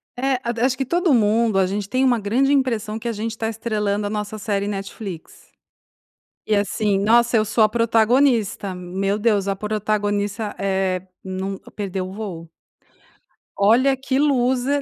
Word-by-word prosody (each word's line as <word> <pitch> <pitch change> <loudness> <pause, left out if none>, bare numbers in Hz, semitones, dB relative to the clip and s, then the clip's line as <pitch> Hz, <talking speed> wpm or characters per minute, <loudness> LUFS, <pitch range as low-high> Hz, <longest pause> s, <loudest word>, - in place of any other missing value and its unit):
É, 260 0 0
ada 235 0 -2
acho 260 0 +1
que 270 - -1
todo 345 +3 +1
mundo 220 -2 +3
a 190 - +4
gente 200 +1 -3
tem 255 +3 +1
uma 245 -3 +3
grande 250 +7 +1
impressão 230 -5 0
que 235 - -6
a - - 0
gente 225 +1 -4
tá 225 0 -2
estrelando 210 -2 -2
a 205 - -2
nossa 210 0 -4
série 200 -1 -2
Netflix. 195 -3 -7 0.9
E 215 - +1
assim, 200 0 0
nossa 235 +3 +4
eu 215 - +2
sou 220 +1 +2
a 215 - +4
protagonista, 230 -3 +2
meu 190 +3 -2
Deus 210 -3 +1
a 195 - 0
protagonista, 205 0 -2
eh, 190 -2 0 0.2
nunca 190 +1 -5
perdeu 190 -2 -4
o - - -8
voo. 180 -6 -7 1.1
Olha 245 +7 +4
que 265 0 -2
loser, 270 0 +2
215 Hz, 160 wpm, -21 LUFS, 200-240 Hz, 1.1 s, a